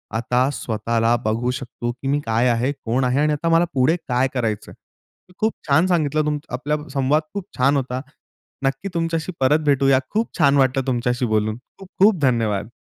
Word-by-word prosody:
आता 125 +3 +1
स्वतःला 115 0 0
बघू 115 +3 0
शकतो 125 -2 -5
की 125 +3 -8
मी 145 +2 +1
काय 115 +2 +2
आहे, 120 +3 +1
कोण 130 -2 -2
आहे 125 +2 +1
आणि 150 0 +2
आता 160 +3 -1
मला 165 +1 +4
पुढे 135 +4 +3
काय 125 +1 +2
करायचं? 115 -5 -2
मी 180 - -25
खूप 220 +1 +1
छान 150 +4 +4
सांगितलं 155 -4 +1
तुम 150 -1 0 0.2
आपला 145 +4 -1 0.2
संवाद 140 +2 +2
खूप 200 -2 -4
छान 140 +3 +3
होता. 130 -1 -3 0.6
नक्की 135 +8 -1
तुमच्याशी 165 0 -1
परत 135 +4 +3
भेटूया. 135 -2 +4
खूप 220 +2 -1
छान 140 0 +4
वाटलं 135 0 +2
तुमच्याशी 125 0 0
बोलून. 110 -1 0 0.2
खूप 195 - -11
खूप 200 -1 +5
धन्यवाद. 115 -6 +1
130 Hz, 180 wpm, -21 LUFS, 120-150 Hz, 0.6 s, खूप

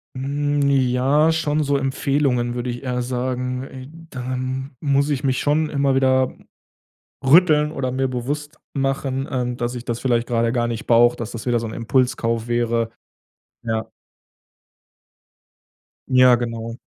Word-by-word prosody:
Hm, 145 +2 0
ja, 135 +3 +3
schon 155 -2 0
so 140 -1 +1
Empfehlungen 135 -2 0
würde 120 0 -3
ich 120 +2 -5
eher 125 -1 -2
sagen, 125 +1 -2
äh 130 -1 -9 0.2
dann 130 +1 -4
muss 140 0 +2
ich 145 -1 -1
mich 130 -2 +1
schon 150 +1 +1
immer 140 -2 +1
wieder 130 -1 +2 0.9
rütteln 150 +1 +5
oder 130 -4 -2
mir 130 +1 0
bewusst 145 +5 -4 0.2
machen, 135 -1 -1
ähm, 125 -2 -2
dass 120 0 -2
ich 120 0 -7
das 120 0 -3
vielleicht 120 -2 0
grade 115 -1 +1
gar 120 -1 0
nicht 115 -2 -5
brauche, 120 +1 +5
dass 115 -1 -6
das 115 - -7
wieder 120 -1 +2
so 115 - -4
'n 110 - -7
Impulskauf 115 -1 0
wäre. 120 -1 0 0.7
Ja. 110 -1 -2 2.2
Ja, 130 -1 +6
genau. 115 -1 -4
130 Hz, 145 wpm, -21 LUFS, 120-140 Hz, 2.2 s, Ja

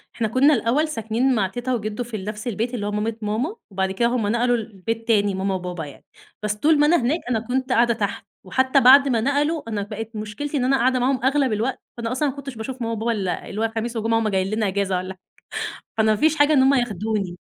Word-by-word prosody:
إحنا 225 - 0
كنا 265 +7 +4
الأول 270 +6 +1
ساكنين 240 -1 0
مع 200 -3 +1
تيتا 245 +6 -3
وجدو 215 0 -3
في 230 -2 -6
نفس 210 +3 -6
البيت 235 +2 -2
اللي 205 -4 -3
هو 205 - -2
مامت 220 +2 -3
ماما، 230 - -1 0.2
وبعد 190 0 -1
كده 235 +5 +1
هم 240 -3 0
نقلوا 240 +3 +2
لبيت 225 +1 -5
تاني 205 -4 +2
ماما 190 0 -1
وبابا 180 -3 -5
يعني، 140 - -13 0.4
بس 210 0 0
طول 295 +8 +3
ما 295 - +5
أنا 345 - +5
هناك 275 +8 +1
أنا 230 -3 +1
كنت 255 +3 -2
قاعدة 235 -1 +4
تحت، 205 -3 -3 0.2
وحتى 260 +8 +2
بعد 275 +3 +8
ما 235 -4 +1
نقلوا، 285 +2 0
أنا 210 -2 -2
بقِت 220 +2 -7
مشكلتي 215 +8 -4
إن 250 - +1
أنا 270 +1 +3
قاعدة 255 0 +2
معاهم 255 0 0
أغلب 265 -3 +2
الوقت، 230 +6 -1 0.2
فأنا 230 -1 -3
أصلًا 280 +3 0
ما 270 - -6
كنتش 275 -2 -7
باشوف 250 +3 -6
ماما 230 0 -1
وبابا 225 +1 -1
إلا 195 -5 -3
اللي 210 - -4
هو 225 - +1
خميس 235 +1 -3
وجمعة 225 +1 +1
وهُم 225 - 0
جايين 190 -1 0
لنا 215 -2 0
إجازة 195 -1 0
والَّا 185 +1 -5 0.6
حاجة، - - -17
فأنا 220 0 +4
ما 215 - +3
فيش 310 +7 +3
حاجة 290 0 +4
إن 275 - +5
هم 270 +1 +5
ياخدوني. 210 -6 -1
230 Hz, 240 wpm, -22 LUFS, 210-260 Hz, 0.6 s, بعد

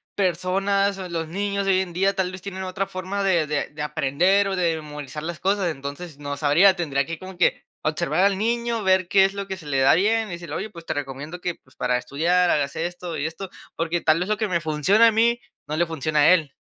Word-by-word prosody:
personas 195 +2 +1
o 185 -1 -6
los 165 -2 -3
niños 200 +3 -2
de 195 - +3
hoy 185 - +3
en 180 -2 -5
día, 195 +3 +2
tal 190 -2 -1
vez 185 0 -9
tienen 190 -1 -6
otra 185 +1 -2
forma 190 +2 -4
de 175 -5 +2
de 150 -1 -1
de 150 0 -8
aprender 175 +8 +2
o 195 - -1
de 170 -3 +1
memorizar 150 -1 -7
las 170 0 -5
cosas. 195 -2 +1
Entonces, 145 +2 -8
no 145 -1 -5
sabría, 160 +7 +5
tendría 140 -6 -1
que 165 +3 -5
como 185 +1 -10
que 180 - +2 0.2
observar 155 +2 0
al 200 -1 +2
niño, 235 +1 -1
ver 185 -1 +3
qué 190 +1 +5
es 195 - -1
lo 200 0 -5
que 190 -1 -4
se 170 - -13
le 140 -2 0
da 135 +1 +5
bien 220 +5 +2
y - - -9
decirle: 170 0 -6
"Oye, 220 - -4
pues, 170 -5 -12
te - - -2
recomiendo 145 +4 -6
que, 175 -1 -2
pues, 130 - -24
para 125 0 0
estudiar, 175 +8 +1
hagas 140 -2 0
esto 175 0 -4
y 145 - -2
esto", 170 +4 -5 0.3
porque 165 +1 -1
tal 155 +1 +3
vez 180 +3 -2
lo 215 - +1
que 215 0 -1
me 175 -3 0
funciona 165 +9 +4
a - - +4
mí, 235 +2 +2 0.3
no 150 - -3
le 175 - +3
funciona 155 -1 -1
a 145 - +6
él. 155 -6 0
175 Hz, 250 wpm, -23 LUFS, 155-195 Hz, 0.3 s, a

